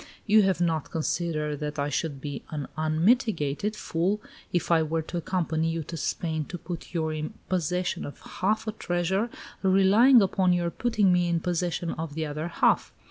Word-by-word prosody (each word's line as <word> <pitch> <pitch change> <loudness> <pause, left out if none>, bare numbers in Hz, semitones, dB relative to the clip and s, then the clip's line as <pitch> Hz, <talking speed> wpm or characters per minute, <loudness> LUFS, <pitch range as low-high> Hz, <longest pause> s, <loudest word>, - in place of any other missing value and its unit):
"You 215 0 +6
have 190 -3 +2
not 165 -4 0
considered 155 -2 -1
that 150 0 -4
I 145 0 0
should 145 0 -2
be 145 0 -5
an 150 -3 -4
unmitigated 165 - +1
fool 185 +2 -1 0.3
if 175 -1 0
I 165 -1 +5
were 160 +1 -1
to 175 - -5
accompany 165 -2 0
you 165 0 -2
to 165 - -7
Spain 160 0 -2
to 180 - -6
put 175 0 -7
you 160 -1 0
in 155 0 -4
possession 180 0 -1
of 145 - -8
half 210 +4 -1
a - - 0
treasure, 190 +3 -1 0.3
relying 195 +7 +6
upon 185 -1 +2
your 175 -1 0
putting 210 -5 +2
me 175 -1 +2
in 170 -1 +1
possession 175 0 -1
of 160 -2 -5
the 160 0 -1
other 150 +2 -4
half. 170 - +2
170 Hz, 180 wpm, -27 LUFS, 155-190 Hz, 0.3 s, You